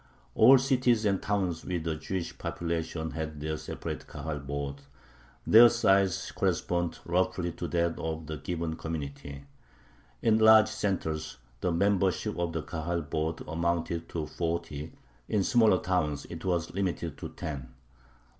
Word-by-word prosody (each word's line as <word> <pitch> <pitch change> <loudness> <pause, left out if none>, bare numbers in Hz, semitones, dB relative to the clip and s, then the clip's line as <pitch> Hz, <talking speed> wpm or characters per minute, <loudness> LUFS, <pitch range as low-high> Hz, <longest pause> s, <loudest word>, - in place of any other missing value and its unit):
All 135 +1 +8
cities 125 -4 +2
and 100 -2 +2
towns 95 -5 -1
with 85 -3 -3
a 80 -1 -1
Jewish 85 +3 -4
population 80 -1 -3
had 80 -2 -5
their 80 +1 -2
separate - - -6
Kahal 80 -2 -5
boards. 70 0 -5 0.6
Their 120 +2 +9
size 95 -6 +2
corresponded 85 -1 0
roughly 90 0 0
to 85 - -5
that 85 -1 0
of 80 0 -4
the 80 0 -5
given 80 +2 -3
community. 70 -3 -6 0.8
In 110 -1 +4
large 110 0 +7
centers 85 - -2 0.2
the 90 - 0
membership 100 +3 +1
of 85 -1 0
the 80 -1 -3
Kahal 85 +2 -3
board 80 +2 -2
amounted 85 0 -1
to 80 -2 -3
forty; 80 -2 -3 0.4
in 105 -3 +2
smaller 110 -4 +4
towns 80 -6 -1
it 85 -1 -7
was 85 -2 -1
limited 90 -4 -2
to - - -5
ten. 70 -5 -6
85 Hz, 140 wpm, -29 LUFS, 80-95 Hz, 0.8 s, Their